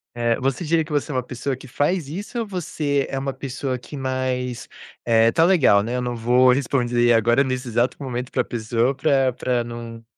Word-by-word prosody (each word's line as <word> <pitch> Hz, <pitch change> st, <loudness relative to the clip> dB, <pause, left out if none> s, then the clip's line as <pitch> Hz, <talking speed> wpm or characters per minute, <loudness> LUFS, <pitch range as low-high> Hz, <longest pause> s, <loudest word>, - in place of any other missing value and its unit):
Eh, 120 Hz, -1 st, +1 dB
você 135 Hz, +6 st, -1 dB
diria 160 Hz, +1 st, +2 dB
que 155 Hz, -, -12 dB
você 150 Hz, +1 st, -1 dB
é -, -, -4 dB
uma 130 Hz, -, 0 dB
pessoa 125 Hz, +2 st, -4 dB
que 130 Hz, -, -13 dB
faz 150 Hz, +5 st, 0 dB
isso 200 Hz, -, -5 dB
ou 230 Hz, -, -2 dB
você 155 Hz, -7 st, -1 dB
é 135 Hz, -, -2 dB
uma 135 Hz, 0 st, -3 dB
pessoa 130 Hz, 0 st, -4 dB
que 125 Hz, +4 st, -11 dB
mais, 130 Hz, -2 st, -3 dB, 0.4 s
eh, 115 Hz, -1 st, +4 dB
está 165 Hz, +7 st, +3 dB
legal, 155 Hz, -, +5 dB
né, 120 Hz, +3 st, -3 dB
eu 125 Hz, -, -1 dB
não 125 Hz, -1 st, -3 dB
vou 125 Hz, +2 st, +4 dB
responder 120 Hz, -2 st, +2 dB
agora 120 Hz, +4 st, +3 dB
nesse 130 Hz, -1 st, -3 dB
exato 120 Hz, +2 st, 0 dB
momento 125 Hz, -2 st, -4 dB
para -, -, +1 dB
a -, -, -4 dB
pessoa 115 Hz, +3 st, -1 dB
para 135 Hz, -2 st, +2 dB
para 125 Hz, -1 st, -1 dB
não, 115 Hz, -1 st, -8 dB
130 Hz, 210 wpm, -22 LUFS, 120-140 Hz, 0.4 s, legal